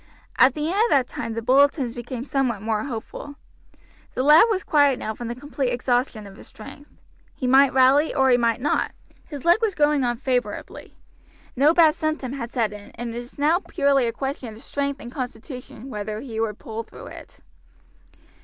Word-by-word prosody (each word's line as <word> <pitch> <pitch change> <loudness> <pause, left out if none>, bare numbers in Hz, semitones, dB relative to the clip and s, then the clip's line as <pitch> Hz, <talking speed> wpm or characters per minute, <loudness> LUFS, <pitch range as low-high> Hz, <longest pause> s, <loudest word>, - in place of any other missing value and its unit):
At 260 - +6
the 300 0 -2
end 400 +3 +1
of - - -1
that 265 -3 +3
time 230 -1 -5
the 230 - -4
bulletins 270 0 +3
became 245 +1 -6
somewhat 255 -8 -1
more 220 -1 -1
hopeful. 275 +3 -7 0.8
The 255 - 0
lad 300 +8 +7
was 385 -4 0
quiet 285 -4 +3
now 220 - -4
from 240 +1 -7
the 235 - -4
complete 275 0 -3
exhaustion 245 -2 -1
of 195 0 -12
his - - -13
strength. 285 +6 -12 0.5
He 260 - -4
might 265 +2 +5
rally 265 +4 +4
or 265 -2 +3
he 245 - +5
might 235 0 0
not; 290 - 0 0.3
his 290 -2 -8
leg 345 +5 +5
was 430 -4 0
going 295 -2 +2
on 240 -1 0
favorably. 250 -1 -3 0.6
No 280 +4 +5
bad 325 -2 +5
symptom 310 -5 -3
had 240 -4 -5
set 225 -4 -1
in, 205 -1 -11
and 235 -1 -5
it 235 - -4
was 245 +1 -11
now 305 +4 +3
purely 280 -8 +1
a - - 0
question 265 -2 -5
of 225 - -14
strength 280 -1 -3
and 240 - -9
constitution 250 0 -7
whether 210 -3 -5
he 225 -3 -6
would 220 -2 -2
pull 225 0 -6
through 230 - -12
it. - - -12
255 Hz, 195 wpm, -23 LUFS, 235-285 Hz, 0.8 s, lad